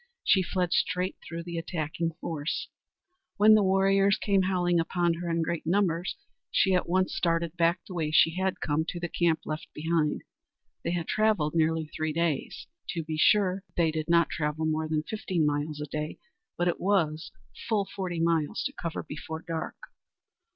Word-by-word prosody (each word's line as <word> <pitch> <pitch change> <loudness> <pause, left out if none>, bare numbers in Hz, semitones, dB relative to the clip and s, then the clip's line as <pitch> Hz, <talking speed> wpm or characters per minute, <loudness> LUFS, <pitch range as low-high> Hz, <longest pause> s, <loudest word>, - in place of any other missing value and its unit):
She 190 - +4
fled 180 -1 -1
straight 185 -1 0
through 170 0 -6
the 170 -1 -4
attacking 165 0 -3
force. 155 -1 -3 0.7
When 215 +1 +7
the 215 - +6
warriors 195 +1 +3
came 200 -2 +2
howling 180 -2 +2
upon 170 +1 +1
her 170 +1 -4
in 165 0 +1
great 165 -1 -3
numbers, 175 -1 +1 0.3
she 190 - +3
at 180 -2 +1
once 185 +1 +2
started 170 -1 0
back 170 +1 +2
the 185 - -9
way 160 -3 -1
she 160 +1 +5
had 190 +1 -1
come, 155 0 +1
to 175 - -4
the 175 - -2
camp 170 -1 +1
left 155 +1 -4
behind. 160 -1 0 0.6
They - - -1
had 170 -2 -2
travelled 215 -9 +2
nearly 160 -1 +2
three 155 0 -3
days. 165 -3 -1 0.3
To 165 - -2
be 155 0 -4
sure, 195 0 +4
they 165 -2 +3
did 155 0 -3
not 170 0 +4
travel 150 +1 -1
more 155 0 0
than 155 -1 0
fifteen 185 -5 -1
miles 150 +1 -1
a 150 - -3
day, 150 +1 -4 0.4
but 175 - +1
it 175 - 0
was 170 -5 +1 0.4
full 210 -3 +2
forty 180 -3 -3
miles 165 +2 +1
to 275 - -3
cover 170 - -4
before 160 +1 -7
dark. 165 -1 -3
170 Hz, 180 wpm, -28 LUFS, 160-185 Hz, 0.7 s, When